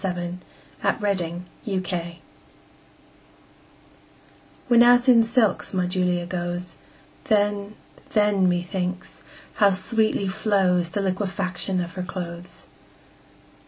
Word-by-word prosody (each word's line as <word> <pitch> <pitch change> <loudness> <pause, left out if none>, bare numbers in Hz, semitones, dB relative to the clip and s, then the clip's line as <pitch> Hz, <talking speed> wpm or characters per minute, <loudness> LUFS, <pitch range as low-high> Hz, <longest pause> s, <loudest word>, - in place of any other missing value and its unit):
Upon 180 -1 -3 0.6
Julia's 180 -4 -1 0.2
Clothes 185 -5 -3 2.5
WHENAS 245 +1 +6
in 240 -3 +7
silks 225 -4 +1
my 180 -1 +1
Julia 180 -1 0
goes, 175 0 -4 0.5
Then, 205 -1 0 0.4
then, 205 -3 +3
methinks, 180 +1 -3 0.4
how 205 -2 +6
sweetly 200 +1 +1
flows 185 -3 +1
The 200 +4 -2
liquefaction 190 -1 -2
of 175 0 -5
her 185 - -5
clothes! 180 -1 -7
185 Hz, 90 wpm, -24 LUFS, 180-205 Hz, 2.5 s, in